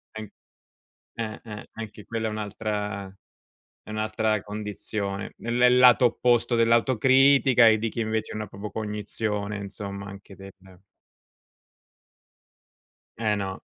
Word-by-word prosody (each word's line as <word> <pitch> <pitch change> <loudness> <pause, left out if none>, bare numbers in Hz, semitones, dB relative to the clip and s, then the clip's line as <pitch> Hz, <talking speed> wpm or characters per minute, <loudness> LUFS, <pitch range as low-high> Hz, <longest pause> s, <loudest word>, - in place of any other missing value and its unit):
An 110 -2 -7 0.9
eh, 110 -2 -5
eh, 105 -2 -9
anche 110 -1 -9
quella 115 -1 -3
è - - -1
un'altra 105 -1 -4 0.8
è - - -11
un'altra 110 0 -1
condizione 105 -1 -5
nel 120 0 -4
nel 125 +1 +5
lato 125 0 +7
opposto 120 0 +2
dell'autocritica 130 +2 +4
e 110 -1 +5
di 115 +2 -1
chi 110 - -9
invece 110 -1 -2
non 110 - -3
ha - - -5
proprio 100 +2 -8
cognizione, 105 -1 -3
insomma 100 0 -7
anche 100 -1 -11
del 95 +1 -11 2.7
Eh, 110 -2 +1
no. 95 -2 -4
110 Hz, 120 wpm, -25 LUFS, 105-115 Hz, 2.7 s, lato